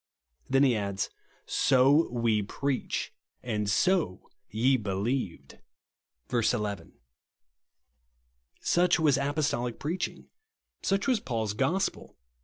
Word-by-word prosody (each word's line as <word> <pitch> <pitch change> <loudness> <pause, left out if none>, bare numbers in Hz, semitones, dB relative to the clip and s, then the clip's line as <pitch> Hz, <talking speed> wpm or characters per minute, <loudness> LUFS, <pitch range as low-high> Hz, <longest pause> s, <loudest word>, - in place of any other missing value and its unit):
Then 135 +1 +4
he 130 -4 +4
adds: 100 -2 -2 0.2
" - - -33
So 135 +4 +4
WE 115 -3 +1
PREACH, 135 +6 -2 0.3
AND 105 -4 -1
SO 160 - +1 0.2
YE 120 +7 +2
BELIEVED," 105 -1 -3 0.7
(verse 120 -2 +1
11.) 100 -5 -4 1.7
Such 175 0 +3
was 150 -4 +4
apostolic 140 -4 -1
preaching. 170 +5 -3 0.6
Such 195 +3 0
was 250 -4 +3
Paul's 110 - -2
gospel. 140 - -1
125 Hz, 100 wpm, -28 LUFS, 105-145 Hz, 1.7 s, Then